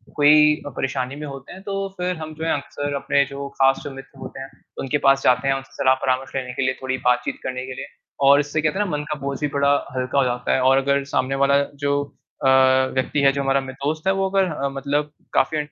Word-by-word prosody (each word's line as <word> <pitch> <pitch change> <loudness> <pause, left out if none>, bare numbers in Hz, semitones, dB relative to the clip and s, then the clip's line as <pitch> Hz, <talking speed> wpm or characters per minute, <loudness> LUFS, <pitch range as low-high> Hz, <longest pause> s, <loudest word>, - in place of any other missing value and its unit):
कोई 150 +1 +6
अ, - - -4
परेशानी 130 0 -3
में 150 0 -6
होते 135 -1 -9
हैं 190 - -11
तो 195 -1 -3
फिर 180 0 -1
हम 155 0 -6
जो 160 +1 -5
है - - +1
अक्सर 145 0 -5
अपने 140 - +3
जो 140 0 -5
ख़ास 135 0 +4
जो 145 - -6
मित्र 135 0 -12
होते - - -8
हैं 135 - -8 0.3
उनके 135 +2 0
पास 135 0 +4
जाते 125 +2 +3
हैं, 135 - +3
उनसे 135 0 -8
सलाह 130 -1 +3
परामर्श 130 +1 -1
लेने 125 -1 -3
के - - -3
लिए 130 - +1
थोड़ी 130 0 -2
बातचीत 125 0 +1
करने 130 0 -4
के 130 - -6
लिए - - -6 0.4
और 140 +1 +7
इससे 145 +2 -1
कहते 155 +6 0
हैं 210 - +2
ना - - -4
मन 150 - -4
का 150 - -7
बोझ 140 0 -4
भी 150 - 0
बड़ा 140 0 +3 0.2
हल्का 130 +2 -2
हो - - +4
जाता 125 0 -1
है 130 - +2
और 130 +1 +4
अगर 140 +1 +1
सामने 135 +1 +1
वाला 140 0 +4 0.2
जो 140 - +2 0.5
अ, - - +5 0.5
व्यक्ति 130 +2 0
है 140 -1 +5
जो 140 - -2
हमारा 135 0 +2
मि 130 -1 -8
दोस्त 150 +6 -3
है - - +5
वो 195 0 0
अगर 195 0 +2
अ, 140 -2 -2
मतलब 145 +2 -2 0.2
काफ़ी 155 0 +2
140 Hz, 250 wpm, -22 LUFS, 135-150 Hz, 0.5 s, और